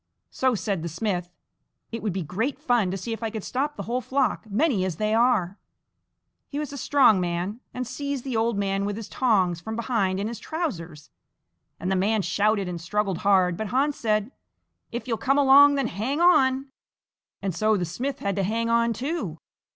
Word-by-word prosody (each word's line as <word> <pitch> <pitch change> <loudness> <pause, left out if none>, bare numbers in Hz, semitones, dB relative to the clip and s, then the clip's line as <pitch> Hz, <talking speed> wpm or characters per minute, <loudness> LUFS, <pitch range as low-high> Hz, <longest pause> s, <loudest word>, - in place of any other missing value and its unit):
So 260 -2 +1
said 200 -4 -2
the 170 - -4
smith: 180 0 -2 0.6
"It 230 -1 -4
would 210 - -1
be 185 0 -3
great 220 - -2
fun 240 -6 +1
to 190 - -2
see 210 +5 -4
if 225 - -7
I 225 - -1
could 220 -2 -6
stop 290 +3 -2
the - - -5
whole 245 +2 -2
flock, 255 -4 -1
many 225 - +1
as 185 -3 -2
they 215 +4 0
are!" 220 -5 +2 0.9
He 285 - -6
was 295 -1 -4
a - - -5
strong 245 -10 +4
man, 175 +5 -2
and 250 0 -4
seized 280 +1 -4
the 260 -3 -3
old 225 -1 +1
man 195 0 0
with 205 0 -2
his 220 -1 -7
tongs 190 -10 +1
from 220 +4 -5
behind 220 -5 0
in 205 - -1
his 230 -1 -6
trousers, 175 - -5 0.7
and 185 - -2
the - - +2
man 205 +2 +1
shouted 205 -1 +1
and 175 -2 -5
struggled 195 +1 -1
hard, 185 -3 +3
but 220 +4 -4
Hans 275 +6 +1
said: 215 +1 0 0.6
"If 240 +2 -5
you'll 230 -2 0
come 275 +2 +2
along, 285 +1 +7
then 275 -2 0
hang 235 - -2
on!" 270 -6 +4 0.7
And 195 -2 -1
so 215 +5 +2
the 180 - -1
smith 245 - -3
had 200 -1 -1
to 195 - +1
hang 230 +4 0
on 235 0 +3
too. 250 - -3
220 Hz, 200 wpm, -25 LUFS, 190-255 Hz, 0.9 s, along